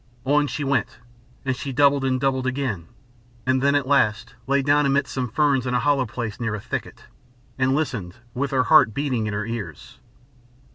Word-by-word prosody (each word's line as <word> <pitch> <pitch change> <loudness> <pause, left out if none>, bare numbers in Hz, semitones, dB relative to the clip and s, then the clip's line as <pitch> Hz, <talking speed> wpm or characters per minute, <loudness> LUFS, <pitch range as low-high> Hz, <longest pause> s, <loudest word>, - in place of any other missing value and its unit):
On 145 +2 +3
she 150 - -4
went, 140 -1 -1 0.5
and 130 -1 0
she 135 +2 -5
doubled 140 +1 +3
and 130 -1 +1
doubled 130 -1 0
again, 130 -11 -2 0.6
and 130 0 +2
then 140 +1 +3
at 145 -2 +1
last 120 -4 +1
lay 140 0 +2
down 145 +1 +3
amidst 140 +1 0
some 125 -2 -2
ferns 135 0 +1
in 125 - 0
a - - +3
hollow 135 -1 +1
place 110 -1 -5
near 115 -3 -2
a - - -5
thicket, - - -6 0.6
and 130 +1 +2
listened 120 - -3 0.2
with 140 +3 -2
her 130 -2 +2
heart 110 -2 +5
beating 130 -6 -1
in 105 - -3
her 105 +1 -2
ears. 105 - -7
130 Hz, 190 wpm, -23 LUFS, 115-140 Hz, 0.6 s, heart